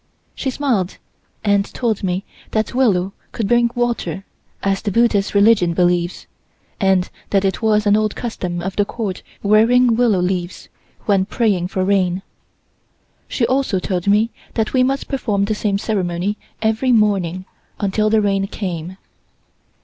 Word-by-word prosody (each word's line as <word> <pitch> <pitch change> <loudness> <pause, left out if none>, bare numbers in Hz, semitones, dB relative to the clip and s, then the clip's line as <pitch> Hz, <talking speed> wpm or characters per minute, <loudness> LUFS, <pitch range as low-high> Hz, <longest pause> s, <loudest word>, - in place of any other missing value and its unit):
She 270 - -3
smiled 245 -9 -1 0.5
and 200 -1 +3
told 225 0 -2
me 185 +1 -1 0.2
that 220 0 -1
willow 200 -7 +2 0.2
could 220 - -2
bring 240 +1 +3
water, 240 -5 -2 0.4
as 195 0 +1
the 215 - -2
Buddhist 210 -2 +2
religion 200 -5 +4
believes, 175 0 +1 0.5
and 190 -2 +2 0.2
that 195 -1 +2
it 190 +3 -1
was 215 -1 +2
an 205 0 +5
old 215 0 0
custom 180 -7 -4
of 190 +1 -4
the 205 - +4
Court 205 -3 -4 0.2
wearing 230 +4 +4
willow 235 -4 +3
leaves, 180 0 -2 0.4
when 195 -3 +2
praying 205 -4 0
for 185 0 -1
rain. 190 -2 +1 1.0
She 235 - 0
also 260 -6 +1
told 180 0 -2
me 210 +3 +3 0.2
that 220 -2 -1
we 260 - +4
must 270 +2 0
perform 210 -8 0
the 215 - -1
same 205 -1 0
ceremony 195 -2 -1 0.3
every 220 +4 +1
morning 195 -5 +1 0.3
until 210 +1 +1
the 220 0 +3
rain 195 -1 +1
came. 180 -3 -5
205 Hz, 150 wpm, -19 LUFS, 185-225 Hz, 1.0 s, an